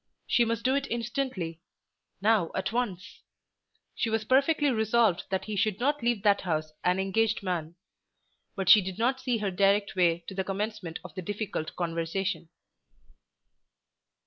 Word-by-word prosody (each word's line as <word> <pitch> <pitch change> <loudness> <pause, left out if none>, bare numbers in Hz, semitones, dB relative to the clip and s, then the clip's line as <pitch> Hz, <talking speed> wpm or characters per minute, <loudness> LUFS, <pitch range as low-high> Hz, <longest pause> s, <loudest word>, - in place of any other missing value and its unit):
She 240 - +3
must 230 0 -2
do 260 - +3
it 275 0 0
instantly; 235 - -3 0.6
now 210 -5 +3
at 190 - -1
once. 210 -6 -3 0.7
She 230 - -1
was 220 -1 -1
perfectly 280 +4 +3
resolved 220 -4 +2
that 190 0 -1
he 215 - -4
should 210 0 0
not 290 +3 +1
leave 235 -4 0
that 205 -2 +4
house 155 -3 -2
an 180 +1 +2
engaged 210 +3 +1
man. 170 -3 -3 0.8
But 195 -3 -3
she 205 +2 +9
did 185 -1 -5
not 255 +4 +1
see 250 -2 0
her 205 -3 -2
direct 200 +2 +2
way 170 -2 +2
to - - -6
the 190 0 -1
commencement 195 -3 -4
of 185 - -10
the 185 - -5
difficult 205 -4 -4
conversation. 170 +1 -2
205 Hz, 155 wpm, -28 LUFS, 180-230 Hz, 0.8 s, she